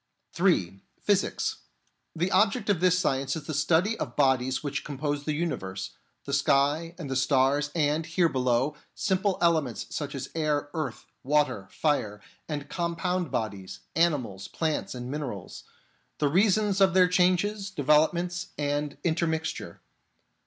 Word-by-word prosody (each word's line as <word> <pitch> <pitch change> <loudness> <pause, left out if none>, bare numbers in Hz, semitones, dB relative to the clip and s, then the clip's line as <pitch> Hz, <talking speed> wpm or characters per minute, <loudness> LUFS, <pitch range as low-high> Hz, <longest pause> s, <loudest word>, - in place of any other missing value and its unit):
(3) 100 - +1 0.2
Physics. 200 -2 0 0.6
The 175 +3 0
object 205 +1 +3
of 190 - +1
this 180 0 +4
science 135 -6 0
is 160 - -5
the 155 - -4
study 160 +8 +2
of - - -1
the - - -18
bodies 130 -1 +2
which 145 -1 -3
compose 145 0 -3
the 155 - 0
universe: 95 - -3 0.3
the 140 - -4
sky 145 +4 +2
and 165 -5 -6
the 135 - -3
stars, 135 +2 +2
and, 155 0 +1
here 170 +1 +3
below, 130 +1 +1 0.2
simple 190 -1 0
ele 170 -2 +5
ments 125 -5 -6
such 145 -2 -4
as 135 0 -5
air, 150 -2 0
earth, 160 -2 -4 0.2
water, 145 -8 +1
fire, 110 -9 0 0.3
and 145 -2 -4
compound 175 +2 -1
bodies 100 -4 -4
— - - -46
animals, 135 - +1
plants 155 -5 -2
and 125 +1 -6
minerals; 130 -11 -6 0.5
the 150 - +2
reasons 200 +3 +3
of 190 -2 +5
their 185 -1 +6
changes, 185 +3 +2
developments, 170 +2 +2
and 145 0 -2
intermixture. 160 -1 -2
150 Hz, 145 wpm, -27 LUFS, 135-175 Hz, 0.6 s, their